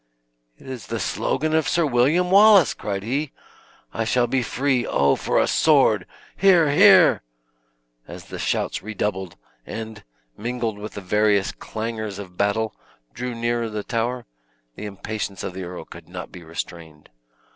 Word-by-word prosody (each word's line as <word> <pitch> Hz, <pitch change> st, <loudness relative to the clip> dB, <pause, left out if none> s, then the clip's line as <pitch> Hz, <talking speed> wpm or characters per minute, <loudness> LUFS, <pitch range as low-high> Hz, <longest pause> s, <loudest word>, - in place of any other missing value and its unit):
"It -, -, -18 dB
is 130 Hz, -5 st, -7 dB
the -, -, -3 dB
slogan 155 Hz, +2 st, -1 dB
of 160 Hz, -2 st, +2 dB
Sir 170 Hz, -1 st, +2 dB
William 150 Hz, +8 st, +2 dB
Wallace!" 200 Hz, -3 st, +7 dB
cried 100 Hz, -2 st, -4 dB
he; 135 Hz, +6 st, -2 dB, 0.6 s
"I 115 Hz, -, -1 dB
shall 120 Hz, +2 st, +2 dB
be 130 Hz, +1 st, 0 dB
free! 130 Hz, +1 st, 0 dB
O, 70 Hz, -9 st, +2 dB
for -, -, 0 dB
a -, -, +3 dB
sword! -, -, +3 dB, 0.3 s
Hear, 175 Hz, -6 st, +4 dB
hear!" 185 Hz, +1 st, +6 dB, 0.9 s
As -, -, -10 dB
the -, -, -8 dB
shouts -, -, -1 dB
redoubled, 95 Hz, -4 st, -3 dB, 0.3 s
and, 110 Hz, -, -7 dB, 0.3 s
mingled 115 Hz, -2 st, -3 dB
with 105 Hz, +1 st, -7 dB
the 100 Hz, -, -5 dB
various 100 Hz, +1 st, +2 dB
clangors 110 Hz, -2 st, -5 dB
of 95 Hz, -3 st, -9 dB
battle, 105 Hz, +3 st, 0 dB, 0.4 s
drew 125 Hz, -, -4 dB
nearer 115 Hz, 0 st, -1 dB
the 105 Hz, -1 st, -4 dB
tower, 120 Hz, +2 st, -2 dB, 0.5 s
the 105 Hz, -, -7 dB
impatience 105 Hz, 0 st, -5 dB
of -, -, -4 dB
the 95 Hz, 0 st, -6 dB
earl 90 Hz, 0 st, -8 dB
could -, -, -13 dB
not -, -, -8 dB
be 90 Hz, -, -11 dB
restrained. 80 Hz, -1 st, -8 dB
115 Hz, 155 wpm, -23 LUFS, 100-135 Hz, 0.9 s, Wallace